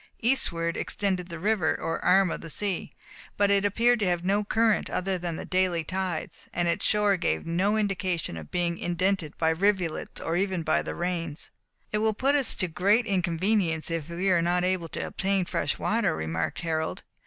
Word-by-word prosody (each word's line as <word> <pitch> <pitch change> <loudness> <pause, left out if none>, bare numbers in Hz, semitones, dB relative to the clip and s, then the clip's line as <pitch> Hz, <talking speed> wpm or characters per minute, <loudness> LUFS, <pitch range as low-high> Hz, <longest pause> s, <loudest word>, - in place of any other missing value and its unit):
Eastward 170 -9 +1
extended 185 -3 -2
the 170 - -6
river, 190 -2 +1
or 165 - -3
arm 185 0 +4
of - - -4
the 165 - -8
sea, 195 +2 -1 0.5
but 200 0 +3
it 200 0 +4
appeared 235 +4 +3
to 210 - +1
have 175 -1 0
no 200 +2 +2
current, 220 +1 +2
other 190 +1 -1
than 175 -2 -3
the - - -6
daily 185 -2 +1
tides, 185 0 -4
and 175 0 +1
its 170 - 0
shore 210 -2 +3
gave 80 - -1
no 190 +6 +1
indication 185 - -1
of 80 -2 -8
being 175 -1 -1
indented 175 -2 -1
by 160 0 +2
rivulets, 180 -1 0
or 165 - -2
even 190 -2 0
by 155 - +2
the - - -5
rains. 170 -3 -3 0.4
"It 210 - 0
will 220 0 +1
put 270 +5 +2
us 280 -3 +4
to 185 - -1
great 200 +8 +2
inconvenience 180 -3 0
if 165 -1 -3
we 180 +3 0
are 175 -2 +4
not 175 +1 +1
able 180 -2 0
to - - -4
obtain 195 -1 0
fresh 145 - -1
water," 215 -6 +1
remarked 80 +1 -2
Harold. 160 -1 -2
180 Hz, 190 wpm, -27 LUFS, 170-200 Hz, 0.5 s, arm